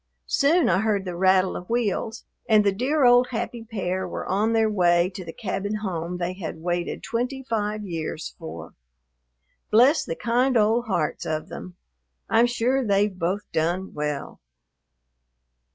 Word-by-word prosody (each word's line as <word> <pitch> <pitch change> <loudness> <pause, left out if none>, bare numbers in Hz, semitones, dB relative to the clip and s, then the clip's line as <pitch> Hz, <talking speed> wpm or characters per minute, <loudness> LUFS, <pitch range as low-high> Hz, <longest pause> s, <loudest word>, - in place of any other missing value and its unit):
Soon 320 - +3
I 185 +1 +3
heard 205 -2 0
the 180 -1 -4
rattle 185 +1 +3
of 180 - -7
wheels, 230 -1 -1 0.2
and 215 -1 +6
the 200 - +3
dear 260 +8 +1
old 245 +1 +6
happy 235 -1 -4
pair 190 -4 -3
were - - -5
on 210 +4 +1
their 225 -1 +3
way 175 -3 +3
to 185 - -6
the 165 - -7
cabin 205 +5 -3
home 180 -4 -3
they 175 +1 -2
had 170 -3 -6
waited 175 0 -2
twenty 250 +4 -2
five 210 -2 -2
years 165 -3 -4
for. 80 +1 -8 1.0
Bless 255 +8 +5
the 165 - -4
kind 245 +5 +1
old 225 +3 +3
hearts 175 -7 -1
of 155 0 -3
them! 180 - -8 0.6
I'm 235 +2 +5
sure 245 +3 +1
they've 200 -2 +2
both 185 +4 -1
"done 175 +4 -1
well." 150 -1 -4
200 Hz, 155 wpm, -24 LUFS, 175-230 Hz, 1.0 s, and